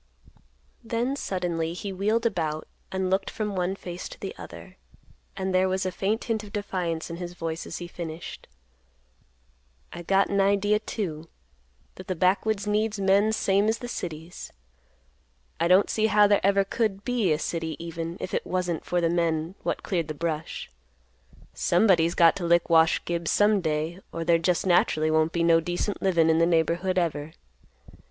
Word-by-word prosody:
Then 235 +3 -1
suddenly 175 -8 -2
he 195 +2 -5
wheeled 215 +5 0
about 155 -8 -1 0.2
and 190 -1 -1
looked 195 +1 +1
from 210 -2 -3
one 185 +1 -1
face 175 -2 -7
to - - -12
the - - -5
other; - - -11 0.6
and 190 -1 -2
there 185 +1 +3
was 190 0 -1
a 185 - -1
faint 200 +5 -1
hint 220 -2 -2
of 205 - -11
defiance 180 -6 -3
in 170 - -5
his 175 0 -6
voice, 165 -1 -4
as - - -5
he 175 - -6
finished; 170 -1 -7 1.5
"I 175 - -7
got 195 +3 +2
an 200 0 +2
idea, 200 +2 +2
too, 165 -8 -5 0.7
that 185 - -10
the 185 - -2
backwoods 195 +4 +1
needs 210 0 0
men 200 +2 +3
same 200 -1 +2
as 225 - +1
the 245 - -7
cities. 170 -6 -6 1.1
I 170 - +2
don't 185 +3 +5
see 220 0 +1
how 210 -1 +5
there 205 0 +3
ever 200 0 +4
could 200 -1 -2
be 240 -8 +1
a 150 - +3
city 165 0 -3
even, 165 0 -5
if - - -6
it - - 0
wasn't 180 -2 -2
for 175 0 0
the 170 - +2
men 165 0 0
what - - -3
cleared 170 -5 -1
the 155 - -5
brush. 160 - -4 0.8
Somebody's 175 -3 +3
got 165 -1 +6
to 190 - -5
lick 170 0 +2
Wash 160 0 +4
Gibbs 170 -1 -2
some 205 -1 +3
day, 160 +2 -2
or 165 - -4
there 170 0 +4
just 175 +2 +1
naturally 155 -3 +3
won't 155 +1 +2
be 170 -1 0
no 165 -1 +5
decent 175 +5 -3
livin' 170 -4 +3
in 160 0 +3
the 165 - +4
neighborhood 175 +2 +1
ever." 160 -3 -1
180 Hz, 175 wpm, -26 LUFS, 165-200 Hz, 1.5 s, got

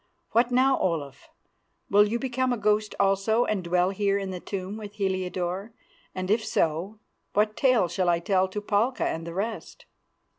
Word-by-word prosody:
What 235 +2 +3
now, 260 +2 +3
Olaf? 145 -6 -3 0.6
Will 205 +1 +5
you 225 +3 -1
become 255 0 -1
a 245 - 0
ghost 210 0 +1
also 200 +4 +2
and 200 -4 -1
dwell 180 +2 +2
here 200 0 +1
in 195 -1 -4
the 180 - -5
tomb 190 +2 -5
with 210 -2 -8
Heliodore; 185 0 -2 0.4
and 185 +1 -2
if 220 +1 +2
so, 170 +4 -1 0.4
what 210 +1 +2
tale 255 -8 +3
shall 175 +1 0
I 170 - +3
tell 185 +2 +1
to 205 +2 -5
Palka 210 +5 0
and 165 +1 -4
the 170 - -6
rest?" 215 +4 -5
200 Hz, 175 wpm, -26 LUFS, 185-220 Hz, 0.6 s, Will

